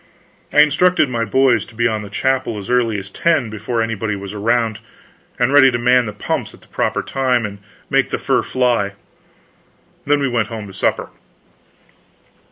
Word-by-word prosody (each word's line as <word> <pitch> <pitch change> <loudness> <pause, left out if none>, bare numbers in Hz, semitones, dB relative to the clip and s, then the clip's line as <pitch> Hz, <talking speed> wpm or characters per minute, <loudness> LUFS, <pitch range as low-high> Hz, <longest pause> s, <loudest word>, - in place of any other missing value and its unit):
I 150 - +6
instructed 155 0 +3
my 115 -2 -1
boys 125 +1 +3
to 115 - -16
be 120 +1 0
in 110 -3 0
the 105 - -9
chapel 130 0 -1
as 100 +3 -6
early 120 -4 +2
as 95 0 -8
10, 145 -8 +1
before 115 +2 -2
anybody 110 -2 -2
was 100 0 -7
around, 110 +1 0 0.6
and 125 0 +2
be - - -1
ready 140 -2 +7
to 120 - -1
man 125 0 +3
the - - -4
pumps 105 - -4
at - - -22
the - - -21
proper - - -1
time, 130 -3 0
and 100 -1 -7 0.3
make - - +1
the - - -2
fur - - +1
fly. 120 -6 0 1.1
Then 145 0 +3
we 140 - 0
went 120 -4 0
home 110 -2 -6
to 95 - -11
supper. 95 - -1
115 Hz, 185 wpm, -18 LUFS, 105-130 Hz, 1.1 s, ready